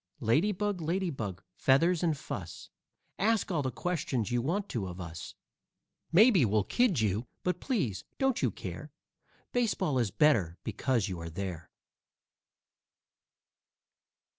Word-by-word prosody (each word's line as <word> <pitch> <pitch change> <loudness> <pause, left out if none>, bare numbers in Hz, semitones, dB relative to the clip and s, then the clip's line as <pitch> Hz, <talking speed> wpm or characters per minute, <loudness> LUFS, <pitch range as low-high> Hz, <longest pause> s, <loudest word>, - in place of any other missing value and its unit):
Lady 150 - +3
Bug, 205 -2 -2
Lady 175 +3 0
Bug, 100 - -5
feathers 155 - +3
and 165 -4 +1
fuss, 90 -7 -7 0.5
Ask 220 0 +2
all 160 -4 +1
the 130 - -1
questions 135 - -2
you 120 0 +2
want 190 - -1
to 105 -7 -2
of 90 0 -7
us. 85 -2 -7 0.8
Maybe 195 - +6
we'll 105 -2 +2
kid 195 - +2
you, 110 +3 0 0.2
but, 180 - 0
please, 150 - -1
don't 265 -2 +1
you - - +3
care; - - -7 0.6
Baseball 195 - +1
is 115 -4 +1
better 100 - +3
because 115 0 0
you 90 -3 -4
are 85 0 -6
there. 85 -1 -5
135 Hz, 135 wpm, -30 LUFS, -, 0.8 s, Maybe